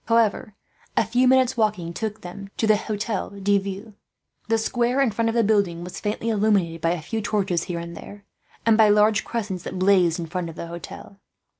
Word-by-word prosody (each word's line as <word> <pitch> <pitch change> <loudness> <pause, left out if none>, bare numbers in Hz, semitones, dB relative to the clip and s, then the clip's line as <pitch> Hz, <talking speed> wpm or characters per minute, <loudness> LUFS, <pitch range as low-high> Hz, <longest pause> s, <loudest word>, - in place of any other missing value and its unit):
However, 225 -3 +1 0.4
a - - +4
few 245 +4 +2
minutes' 260 0 +4
walking 210 -7 0
took 215 +2 -4
them 195 +3 -9
to - - +1
the 215 -1 +5
Hotel 215 0 -3
de 200 0 +1
Ville. 200 +3 -7 0.5
The 225 0 +2
square 240 +3 0
in 270 -5 +3
front 225 +2 0
of 225 - -2
the 235 - +3
building 200 -5 +1
was 180 - -7
faintly 215 +2 -2
illuminated 200 -6 +1
by 165 +1 +2
a 175 - -4
few 220 +6 -3
torches, 195 -5 0
here 175 -2 -4
and 170 0 -6
there, 205 0 -11 0.4
and 225 -1 +4
by 215 -1 +7
large 210 +1 +4
cressets 205 -6 -4
that 185 - -6
blazed 185 -3 +3
in 170 - -3
front 170 +1 -4
of 165 - -10
the - - -6
Hotel. 170 +3 -9
205 Hz, 205 wpm, -24 LUFS, 180-225 Hz, 0.5 s, by